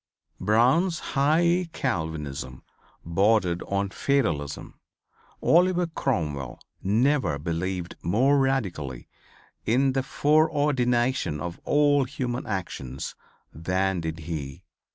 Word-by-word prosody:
Brown's 130 - +3 0.2
high 170 +5 +3
Calvinism 75 - -3 0.4
bordered 90 0 +2
on 100 0 -1
fatalism. 85 - -1 0.6
Oliver 180 +1 +4
Cromwell 75 - -2 0.2
never 110 - +2
believed 85 +3 -3
more 130 +11 +3
radically 95 - -1 0.6
in 130 +4 +2
the 135 - +1
foreordination 135 - +1
of 85 +2 -5
all 145 -2 +3
human 125 -2 -4
actions 70 - -4 0.4
than 95 +3 -1
did 80 0 -4
he. 75 -4 -6
110 Hz, 90 wpm, -26 LUFS, -, 0.6 s, Oliver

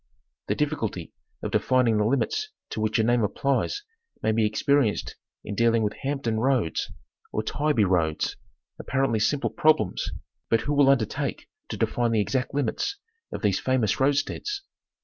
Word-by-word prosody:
The - - 0
difficulty 130 - -2 0.3
of - - -3
defining 125 -4 +3
the 105 - +2
limits 430 - 0 0.2
to 110 - -3
which 110 0 +1
a 110 - +3
name 120 +1 +3
applies 140 - 0 0.4
may 110 - +3
be 110 -1 +2
experienced 120 +1 +1 0.3
in 100 - -5
dealing 115 +1 +3
with 105 - 0
"Hampton 135 -5 -1
Roads," 125 -9 +1 0.4
or 110 - -1
"Tybee 145 -1 +1
Roads 85 -5 +1 0.2
;" - - -53
apparently 135 -4 0
simple 140 +7 +1
problems, 150 -12 +2 0.4
but 115 -1 +3
who 145 - -1
will 140 -1 +5
undertake 125 -6 0 0.2
to - - -4
define 120 -1 +1
the 110 - +3
exact 130 +5 0
limits 145 - -1 0.3
of - - -6
these 100 -3 +2
famous 130 -6 +1
roadsteads 145 - 0
120 Hz, 155 wpm, -26 LUFS, 110-140 Hz, 0.4 s, will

